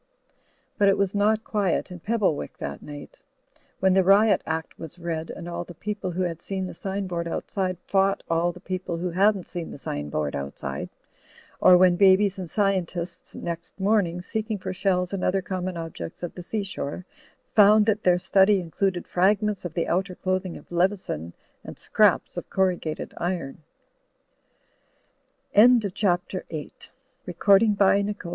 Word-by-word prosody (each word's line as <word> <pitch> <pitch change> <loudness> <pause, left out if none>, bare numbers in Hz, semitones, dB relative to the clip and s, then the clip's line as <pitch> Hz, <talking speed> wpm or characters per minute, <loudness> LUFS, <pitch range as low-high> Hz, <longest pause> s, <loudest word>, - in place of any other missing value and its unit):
But 200 - +5
it 195 - +3
was 195 -1 0
not 215 +2 +2
quiet 200 -4 -1
in 180 - -8
Pebblewick 200 -6 -1
that - - -6
night; 145 -1 -10 0.6
when 190 0 +3
the 190 0 +4
Riot 205 +3 +5
Act 160 0 -4
was 165 +2 -9
read, 165 -2 -4
and 170 - -7
all 175 0 -4
the 175 0 -12
people 205 +1 -4
who 180 +1 -2
had 170 -2 -3
seen 190 -1 -3
the 185 - -6
sign 195 +3 -4
board 170 -2 -3
outside 185 +1 -2
fought 195 0 +1
all 165 +1 +1
the 180 - -13
people 185 -2 -4
who 175 +1 -3
hadn't 195 +1 +2
seen 175 -2 -6
the - - -8
sign 75 - -5
board 75 0 -2
outside; 70 0 -5 0.7
or 185 -1 +7
when 180 -1 +5
babies 195 0 +4
and 180 -3 -6
scientists 180 -4 -2
next 170 +2 -6
morning, 190 -4 +1
seeking 220 +1 -3
for 190 0 -5
shells 185 0 0
and 195 - -2
other 195 +1 +2
common 185 -1 -4
objects 165 - -7
of 175 - -4
the 180 - -8
sea 205 +4 -3
shore, 180 -3 -5 0.5
found 210 0 +6
that 215 -1 +1
their 180 -1 +4
study 195 +2 +4
included 180 +1 -2
fragments 200 +2 +1
of 170 - -5
the 170 - 0
outer 185 +1 -1
clothing 185 -1 -2
of - - -17
Leveson 175 - -1 0.3
and - - -9
scraps - - +2
of - - -5
corrugat 180 -5 -1
185 Hz, 150 wpm, -25 LUFS, 170-195 Hz, 0.7 s, or